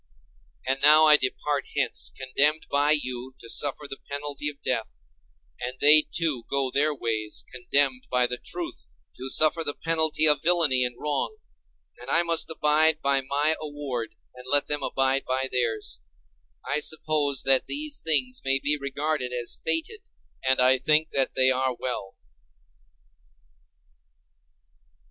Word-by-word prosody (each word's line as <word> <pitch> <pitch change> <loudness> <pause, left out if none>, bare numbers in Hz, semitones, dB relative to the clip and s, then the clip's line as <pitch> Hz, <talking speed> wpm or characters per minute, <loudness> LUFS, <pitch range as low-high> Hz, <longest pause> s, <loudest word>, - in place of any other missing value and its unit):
And 135 +1 -2
now 155 +2 +7
I 155 -1 +8
depart 145 0 -2
hence - - 0
condemned 140 +4 +1
by 145 +1 +2
you 130 -4 0
to 115 - -9
suffer 145 +1 -2
the 135 -1 -8
penalty 145 0 -3
of 145 -1 -14
death, 115 -3 -1 0.7
and 125 +1 -6
they, 150 +1 +7
too, 155 -8 -1
go 135 -2 -1
their 150 +3 +1
ways 110 -6 -4
condemned 130 +1 0
by 125 0 +2
the 125 0 -3
truth 175 -1 -7 0.3
to 130 +1 -5
suffer 155 +4 +3
the 145 - -2
penalty 160 -1 +2
of 150 -2 +6
villainy 160 -7 +3
and 125 -1 -3
wrong; 150 - -3 0.6
and - - -10
I 170 - +3
must 170 -1 0
abide 155 0 +3
by 140 0 +2
my 145 +4 +1
award—let 140 -1 -4
them 145 -1 0
abide 135 0 0
by 130 +1 -2
theirs. 110 - -2 0.7
I 145 - 0
suppose 150 -2 -1
that 135 -1 +2
these 295 0 -3
things 135 -6 -1
may 135 0 +2
be 145 +2 0
regarded 140 -1 -3
as 120 -1 -3
fated—and 70 - -3
I 130 +1 +4
think 155 +4 +1
that 135 -1 -1
they 130 0 +3
are 130 0 -1
well. 110 -6 -5
140 Hz, 140 wpm, -25 LUFS, 130-150 Hz, 0.7 s, I